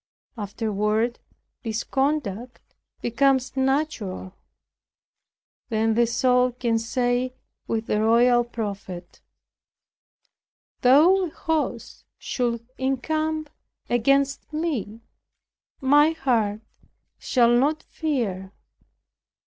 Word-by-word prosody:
Afterward 215 +2 -1 0.4
this 225 -2 -3
conduct 260 -5 -2 0.3
becomes 265 +2 +2
natural; 265 -9 -1 1.4
then 220 -1 +1
the 235 +1 +3
soul 250 +1 +2
can 235 -2 0
say 245 +2 -1 0.3
with 225 0 -1
the 210 - 0
royal 240 +2 +4
prophet, 200 -6 -6 1.6
"Though 325 +10 +5
an - - -5
host 300 -7 -3
should 235 -2 -2
encamp 310 +3 -1 0.4
against 275 +5 +1
me, 280 - -3 0.8
my 295 +4 +5
heart 230 -8 0 0.6
shall 240 -2 +3
not 295 +5 +1
fear. 210 - -3
245 Hz, 80 wpm, -24 LUFS, 225-275 Hz, 1.6 s, Though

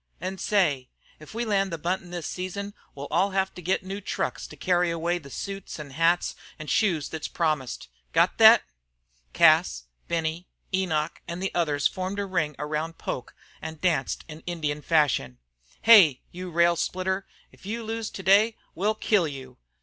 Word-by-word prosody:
"An' 185 +3 -5
say, 150 -11 +1 0.3
if 155 +7 -13
we 235 +1 -1
land 195 -3 +1
the 165 - -3
buntin' 175 +2 -2
this 175 -3 -5
season 200 +2 -5 0.2
we'll 140 0 -6
all 185 +5 +3
have 190 0 +1
to 180 - -9
get 185 +2 0
new 195 +2 -5
trunks - - -3
to - - -12
carry 180 -1 +2
away 170 +1 -1
the 140 -4 -13
suits 195 +4 -6
an' 145 -2 -8
hats 165 +4 +2 0.2
an' 155 - -8
shoes 170 -3 +1
thet's 160 -1 -4
promised. 155 - -2 0.2
Got - - +2
thet?" - - +9 0.7
Cas, - - +4 0.2
Benny, 165 +1 -2 0.3
Enoch, 165 -5 -1
and 170 +1 -5
the 195 +1 -3
others 150 -4 0
formed 185 +2 -4
a 200 - -1
ring 160 -6 -1
around 155 +3 -3
Poke 125 - -5 0.3
and 160 -1 -7
danced 160 -7 0
in 155 -1 -9
Indian 150 -4 -2
fashion. 145 - +1 0.5
"Hey! 190 - +7
you 180 +1 -7
rail 170 0 +3
splitter, 190 +3 -2 0.2
if - - -15
you 230 +2 -3
lose 225 0 -3
today 200 +4 +3 0.2
we'll 210 +4 0
kill 205 -5 +2
you!" 130 -3 -9
175 Hz, 170 wpm, -26 LUFS, 155-190 Hz, 0.7 s, thet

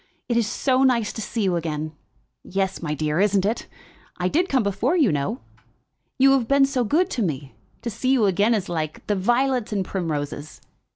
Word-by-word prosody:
"It 240 - 0
is 230 -3 +2
so 260 +3 +1
nice 245 -5 +2
to 220 - -5
see 225 +1 -2
you 185 -3 +1
again." 155 -2 -3 0.5
"Yes, 190 0 -2
my 150 -3 -2
dear, 150 +2 -1
isn't 200 -1 +3
it? 220 +3 -1 0.5
I 180 0 0
did 355 - +1
come 260 -4 +2
before, 205 - 0
you 280 - +4
know." 150 - -2 0.8
"You 270 0 +6
have 265 -4 +2
been 275 +1 +5
so 265 -2 0
good 315 - +2
to 240 - -2
me! 140 -8 -3 0.3
To 235 - -3
see 230 +5 -2
you 250 -5 +4
again 205 +4 +3
is 195 -3 -2
like 155 -3 -4
the 210 - 0
violets 240 +4 +1
and 195 -3 -1
primroses." 150 -5 -4
205 Hz, 195 wpm, -23 LUFS, 175-255 Hz, 0.8 s, You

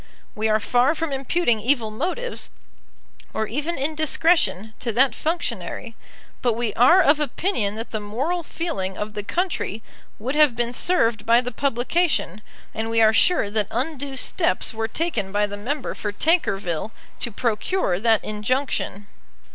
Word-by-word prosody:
We 220 +1 -1
are 215 0 +3
far 245 +7 +2
from 325 -1 -3
imputing 270 -2 +1
evil 230 -1 +1
motives, 370 - -3 0.9
or 220 - 0
even 295 +10 -2
indiscretion, 310 - +2
to 235 - -1
that 260 +4 +4
functionary; 315 -7 -3 0.5
but 240 -2 +2
we 230 -2 -2
are 335 +11 +6
of 295 -3 +4
opinion 285 - -1
that 225 +2 -6
the 215 - -2
moral 260 +13 -2
feeling 300 - -4
of 210 0 -4
the 210 - -3
country 230 - -2 0.3
would 250 +5 -3
have 300 -5 +4
been 240 0 -1
served 230 -11 +2
by 235 +1 +6
the 250 0 -3
publication, 260 - 0 0.3
and 220 +1 -3
we 225 0 +1
are 220 -1 +6
sure 225 - +3
that 210 -2 0
undue 275 +2 -3
steps 330 +4 0
were 225 0 -2
taken 225 - -2
by 205 +1 +2
the 205 0 -6
member 255 +7 -3
for 205 - -4
Tankerville 200 - 0 0.3
to 240 - -1
procure 220 - 0
that 225 0 +3
injunction. 215 -1 -2
240 Hz, 155 wpm, -23 LUFS, 215-310 Hz, 0.9 s, are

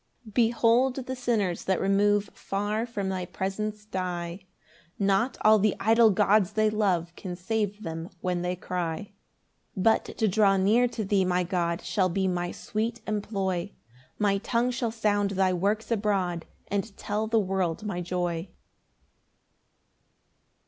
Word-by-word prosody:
5 215 - -13
Behold 235 +2 +3
the 260 - -4
sinners 225 -8 -1
that 190 - +1
remove 205 +1 +2
Far 210 +4 -2
from 205 -5 -3
thy 185 -1 -2
presence 210 +4 -4
die; 180 -1 -4 0.5
Not 200 +5 +1
all 215 0 +6
the 210 0 +2
idol 225 +1 +5
gods 200 0 +3
they 215 0 +2
love 180 -6 0
Can 180 -1 -6
save 210 +2 -2
them 165 0 -5
when 180 -1 -1
they 180 +1 -1
cry. 175 -2 -3
6 200 - -28 0.6
But 220 +4 +3
to 220 - +2
draw 195 0 +4
near 215 +6 +4
to 225 -3 -4
thee, 195 -1 +2
my 180 0 +1
God, 170 -1 -1
Shall 190 -3 +1
be 190 +2 0
my 175 -1 -1
sweet 225 +2 -3
employ; 200 -3 -2 0.4
My 200 -2 +2
tongue 235 +3 0
shall 240 -1 -1
sound 210 -3 +1
thy 190 -1 +3
works 205 +6 -1
abroad, 195 -6 0 0.2
And 200 +1 -3
tell 215 +1 -2
the 225 +1 +2
world 190 -2 -1
my 185 -4 -2
joy. 175 0 -2
200 Hz, 150 wpm, -27 LUFS, 180-215 Hz, 0.6 s, all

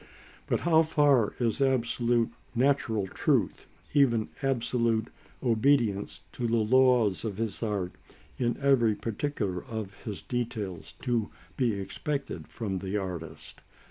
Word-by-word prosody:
But - - 0
how 160 -2 +5
far 145 -8 +3
is 120 +2 0
absolute 120 -3 +2 0.2
natural 120 -5 +2
truth, - - 0 0.3
even 120 -7 +3
absolute 120 -4 +1 0.3
obedience 115 -4 +2
to 120 - -2
the 115 - +1
laws 120 -2 +4
of 105 -4 -3
his 115 -2 -2
art 100 -5 -1 0.5
in 120 -2 0
every 130 -6 +4
particular 105 -6 -3
of 110 -4 -5
his 105 -3 -5
details, 115 -7 -4
to 120 -4 0 0.3
be 120 -5 +1
expected 140 +8 -4
from 100 -5 -4
the 95 +2 -2
artist? 90 -5 -6
115 Hz, 120 wpm, -29 LUFS, 105-130 Hz, 0.5 s, how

